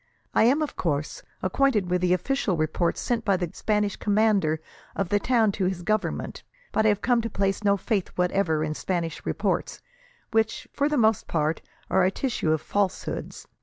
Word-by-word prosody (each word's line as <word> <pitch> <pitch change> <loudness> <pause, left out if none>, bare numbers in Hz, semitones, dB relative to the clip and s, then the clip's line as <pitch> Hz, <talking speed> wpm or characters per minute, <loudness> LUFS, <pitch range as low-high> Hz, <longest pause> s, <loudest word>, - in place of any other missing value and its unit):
I - - +5
am, 280 +6 +4
of 300 - -5
course, 150 -3 -2 0.2
acquainted 210 -1 +2
with 180 0 +2
the 180 -1 +2
official 185 +1 +1
reports, 155 +2 0
sent 235 -2 -1
by 200 -3 +2
the 175 -2 -3
Spanish 210 -2 0
commander 205 -7 +2 0.4
of 195 -3 -1
the 205 - +3
town 225 -2 +3
to 195 -1 -1
his 180 -1 -2
Government, 215 +3 -1 0.3
but 220 0 +2
I - - +6
have 205 -1 0
come 240 -1 +3
to 230 - -3
place 195 0 -1
no 200 -1 +3
faith 200 -2 -1
whatever 180 -3 +1
in 155 0 -1
Spanish 170 -1 -3
reports, - - -1 0.5
which, 220 0 0
for 285 +1 +1
the 300 - 0
most 220 -3 +3
part, 155 0 0 0.3
are 190 - +3
a 185 - +4
tissue 205 - -1
of 155 -1 +1
falsehoods. 200 +1 -2
195 Hz, 185 wpm, -26 LUFS, 175-220 Hz, 0.5 s, I